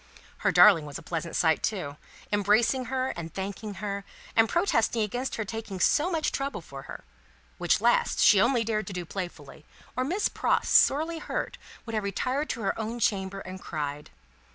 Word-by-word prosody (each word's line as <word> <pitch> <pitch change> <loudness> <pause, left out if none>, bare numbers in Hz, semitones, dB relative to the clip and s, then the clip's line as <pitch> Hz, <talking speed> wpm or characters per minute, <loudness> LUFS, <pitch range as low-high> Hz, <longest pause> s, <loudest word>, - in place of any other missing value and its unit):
Her - - +1
darling 165 -8 +7
was 145 - -6
a 165 - -11
pleasant 165 +1 -4
sight 160 -2 +3
too, 180 -10 -2 0.4
embracing 215 +5 +2
her 260 +1 -1
and 165 -1 -6
thanking 200 +3 -5
her, 200 +1 -4 0.3
and 225 0 +5
protesting 235 - +2
against 245 +5 -3
her 220 - -3
taking 220 -3 -6
so 305 - +3
much 325 -4 0
trouble 275 0 -3
for 135 -4 -10
her - - -8 0.6
which - - +2
last - - +2
she 200 - +6
only 240 0 +3
dared 215 -3 -2
to 200 - -6
do 180 -1 -4
playfully, 165 -6 -7 0.3
or 255 - 0
Miss 360 +10 0
Pross, - - 0
sorely 320 +4 +4
hurt, - - -4 0.3
would 225 - -7
have 215 -1 0
retired 255 +9 -1
to 235 - -3
her 195 +2 -1
own 225 +2 -3
chamber 195 -3 0
and 185 0 -8
cried. 150 -1 -5
210 Hz, 180 wpm, -27 LUFS, 185-250 Hz, 0.6 s, darling